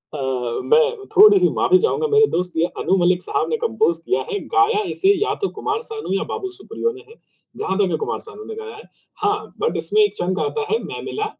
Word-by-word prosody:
हाँ, 145 - -4
हाँ। 125 -3 -2
मैं 465 -2 +2
थोड़ी-सी 400 -2 +7
माफ़ी 370 - +4
चाहूँगा, 455 +1 0
मेरे 435 0 +5
दोस्त। 180 0 -1
ये 165 - +3 0.2
अनु 190 - +2
मलिक 180 0 +2
साहब 160 - -1
ने 155 - 0
कंपोज़ 165 +9 +1
किया 390 - 0
है 410 - -1
गाया 410 +2 +4
है 430 - -2
इसे 390 - +1
या - - -1
तो 395 - 0
कुमार 425 +1 -2
सानू 440 - -4
या - - -1
बाबूल 380 -1 -4
सुप्रियो 465 +4 -3
ने 395 - -12
है। 455 - -15 0.4
जहाँ 190 - -2
तक 195 -3 +2
है, - - 0
कुमार 440 - -3
सानू 425 0 -10
ने 445 - -7
गाया 445 0 -8
है। 435 - -12 0.4
हाँ, 415 +1 -1
बट 460 - 0
इसमें 430 - +1
एक 415 - +2
चंक 185 +2 -1
आता 435 0 -1
है, 445 - +3
"मैं - - -6
मिला 425 - -3
415 Hz, 235 wpm, -21 LUFS, -, 0.4 s, थोड़ी-सी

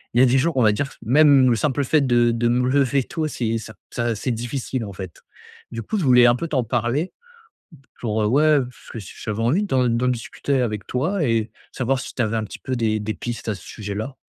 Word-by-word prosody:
y 120 - +5
a - - +7
des 130 +1 +3
jours, 165 +2 0
on 125 - +4
va 105 - +5
dire, 140 +6 -2
même 135 +1 +5
le 120 - +3
simple 145 +2 0
fait 150 +3 +3
de 120 -3 +3
de 115 +1 0
me 125 +1 +2
lever 135 -1 +2
tôt, 160 +2 -3
c'est 115 -5 -2
ça 110 0 -10 0.2
ça 120 -1 -1
c'est 125 +4 -2
difficile, 120 +1 -3
en 100 - -8
fait. 95 -3 -9 0.5
Du 115 - -4
coup, 215 - -2
je - - -1
voulais 125 -2 +6
un 120 - +5
peu 170 - -3
t'en 135 -6 0
parler. 120 - -1 0.9
Pour, 110 -2 -1
heu, - - +2
ouais, 140 +7 +3
heu, 150 -4 +4
parce 125 - -15
que 115 - -6
ch 100 - -11
j'avais 110 -1 -3
envie 150 - +2
d'en 130 -9 +1
d'en 120 +2 +1
discuter 125 +3 -2
avec 105 -4 -2
toi 160 +8 -1
et 115 -3 0 0.2
savoir 130 0 -1
si - - -7
tu - - -1
avais 115 -1 0
un 110 - -1
petit - - -10
peu 130 - -3
des 110 -2 0
des 110 +1 -3
pistes 120 -1 -5
à 105 - -1
ce 95 - -13
sujet-là? 110 +5 -5
120 Hz, 250 wpm, -22 LUFS, 115-135 Hz, 0.9 s, a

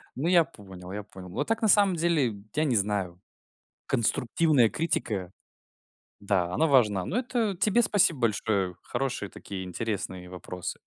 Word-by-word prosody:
Ну, 145 +6 -2
я 175 -2 +6
понял 95 - -12
я 105 +1 -5
понял. 95 -3 -12
Вот - - -3
так, 225 0 0
на 220 - +3
самом 200 -3 +5
деле, 160 -9 +1 0.2
я 155 - +2
не 135 -6 +1
знаю. 95 -4 -1 0.7
Конструктивная 125 +2 +2
критика, 105 - -2 0.9
да, 95 -3 0
она 160 - +2
важна. 105 - +3
Но 225 - -1
это 235 -6 -1
тебе 215 +6 +3
спасибо 175 - +3
большое. 100 -4 0
Хорошие 130 -7 -3
такие, 95 -2 -7
интересные 95 -2 -4
вопросы. 90 0 -6
115 Hz, 150 wpm, -27 LUFS, -, 0.9 s, я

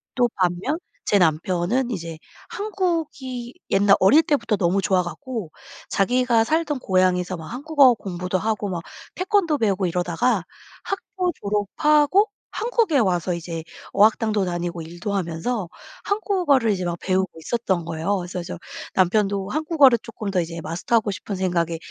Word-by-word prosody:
또 245 -1 +3
반면 185 - 0 0.3
제 205 - +3
남편은 180 +9 +1
이제 165 -5 -5 0.3
한국이 320 - -3 0.2
옛날 200 0 +5
어릴 290 +12 +6
때부터 235 -7 +1
너무 190 +1 +1
좋아 185 -2 +2
갖고 225 - -6 0.4
자기가 235 +2 +2
살던 310 -1 0
고향에서 185 -3 +1
막 160 - -9
한국어 275 - +4
공부도 180 -3 -3
하고 210 -1 -1
막 175 -2 -3 0.3
태권도 370 -6 +1
배우고 195 -4 +1
이러다가 180 +4 0 0.4
학교 380 -2 -2
졸업하고 295 - +2 0.2
한국에 445 - +1
와서 180 -4 +1
이제 165 -1 -5 0.3
어학당도 215 -1 +3
다니고 175 -1 -3
일도 175 +5 -5
하면서 180 +2 -2 0.4
한국어를 360 - +2
이제 185 -3 -2
막 170 0 -2
배우고 190 0 +1
있었던 190 -1 -1
거예요. 165 +5 -1
그래서 180 0 -5
저 170 - -6 0.4
남편도 195 +1 +2
한국어를 300 -4 +4
쪼끔 215 -3 -6
더 180 -2 +2
이제 165 0 -5
마스터하고 205 +7 0
싶은 195 +1 -5
생각에 170 -3 0
200 Hz, 330 characters per minute, -23 LUFS, 180-260 Hz, 0.4 s, 어릴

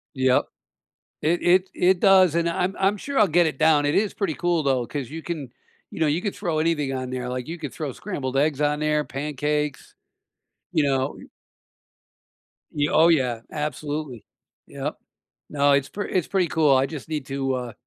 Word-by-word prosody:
Yep. 130 -1 +2 0.8
It 170 +3 +1
it 185 +2 +3
it 180 0 +3
does, 185 -4 +6
and 170 0 +1
I'm 180 +3 -1
I'm 195 +2 +2
sure 280 +6 -3
I'll 210 -3 +5
get 170 +1 +4
it 155 - -2
down, 155 -2 +4
it 145 - +1
is 205 0 +1
pretty 190 -7 -2
cool, 175 -2 0
though, 130 -3 +1
'cause 140 -5 -5
you 160 +2 -7
can, 150 -8 -5 0.4
you - - -8
know, 160 - +3
you 155 +4 +1
could 205 - -3
throw 170 -6 -2
anything 155 -4 0
on 130 -1 -4
there, 125 -1 -4
like, 125 0 -4
you 165 +2 -6
could 145 -6 -6
throw 140 -1 -4
scrambled 135 - -5
eggs 145 0 +1
on 150 0 +1
there, 150 -1 +1
pancakes, 150 0 -3 0.8
you 145 - +2
know? 135 -1 0 1.6
Y 145 0 +1
oh, 165 +2 +5
yeah, 125 -8 +2
absolutely, 150 -3 -4 0.4
yep. - - -5 0.5
No, 145 -1 +3
it's 140 -1 +2
p 205 - -5
it's 185 -3 0
pretty 185 -4 +1
cool, 150 -4 +3
I 130 - +3
just 150 0 -8
need 150 -4 -3
to, 135 -1 -2
uh, 125 -2 -4
150 Hz, 190 wpm, -24 LUFS, 135-170 Hz, 1.6 s, does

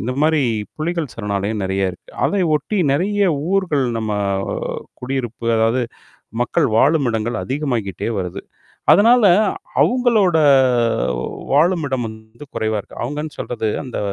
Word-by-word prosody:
இந்தமாரி 145 +5 +1 0.3
புலிகள் 160 -4 -3
சரணாலயம் 105 -1 -2
நெறைய 95 0 0
இருக்கு. 90 - -16 0.2
அதை 200 -1 0
ஒட்டி 210 +7 -3
நிறைய 200 +7 +1 0.3
ஊர்கள் 175 -9 +1
நம்ம 110 -1 -2 0.9
குடியிருப்பு, 125 -3 -4
அதாவது 115 +3 +2 0.6
மக்கள் 120 - +1
வாழும் 140 +2 +3
இடங்கள் 115 +1 -2
அதிகமாகிட்டே 125 - -2
வருது. 90 -1 -5 0.5
அதனால 230 +3 +5 0.6
அவுங்களோட 230 -9 +3 1.1
வாழும் 165 +3 +3
இடம் 130 -3 -2
வந்து 110 +4 -11
குறைவா 110 -1 -1
இருக்கு. - - -15
அவுங்கன்னு 150 +5 -4
சொல்றது 115 -3 -3
அந்த 130 -4 -6
130 Hz, 115 wpm, -19 LUFS, 110-160 Hz, 1.1 s, அதனால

